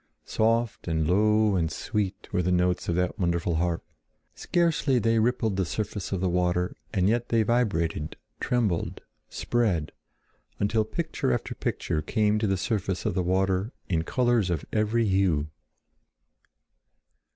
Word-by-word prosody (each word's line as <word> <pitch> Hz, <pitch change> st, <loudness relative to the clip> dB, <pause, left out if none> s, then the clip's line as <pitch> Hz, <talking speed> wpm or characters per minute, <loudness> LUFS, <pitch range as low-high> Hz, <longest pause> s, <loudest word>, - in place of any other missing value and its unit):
Soft 115 Hz, -1 st, 0 dB
and 80 Hz, -2 st, 0 dB
low 105 Hz, +3 st, +3 dB
and 80 Hz, -3 st, 0 dB
sweet 100 Hz, -2 st, -3 dB
were 90 Hz, -, +2 dB
the 90 Hz, +1 st, 0 dB
notes 90 Hz, 0 st, +1 dB
of 85 Hz, -, +1 dB
that 90 Hz, +4 st, -1 dB
wonderful 85 Hz, -2 st, 0 dB
harp. 85 Hz, 0 st, -1 dB, 0.5 s
Scarcely 160 Hz, -6 st, +1 dB
they 115 Hz, -1 st, +2 dB
rippled 110 Hz, -3 st, +1 dB
the 95 Hz, -, +2 dB
surface 100 Hz, +2 st, -4 dB
of 95 Hz, -2 st, -1 dB
the 95 Hz, -, +1 dB
water, 90 Hz, +1 st, 0 dB, 0.2 s
and 95 Hz, -3 st, +2 dB
yet 120 Hz, +2 st, +1 dB
they 115 Hz, -1 st, +3 dB
vibrated, 100 Hz, -10 st, 0 dB, 0.2 s
trembled, 110 Hz, -9 st, -1 dB, 0.3 s
spread, 100 Hz, -11 st, 0 dB, 0.7 s
until 110 Hz, +2 st, +1 dB
picture 160 Hz, -, -2 dB
after 60 Hz, -, -2 dB
picture 75 Hz, -, -2 dB
came 105 Hz, +6 st, +1 dB
to 110 Hz, -, 0 dB
the 95 Hz, -1 st, +1 dB
surface 95 Hz, -1 st, -2 dB
of -, -, +1 dB
the 95 Hz, -, 0 dB
water 95 Hz, +4 st, 0 dB, 0.2 s
in 85 Hz, -3 st, +1 dB
colors 120 Hz, -3 st, +1 dB
of 80 Hz, -4 st, -2 dB
every 110 Hz, +2 st, +2 dB
hue. 90 Hz, -7 st, +1 dB
95 Hz, 145 wpm, -27 LUFS, 90-110 Hz, 0.7 s, low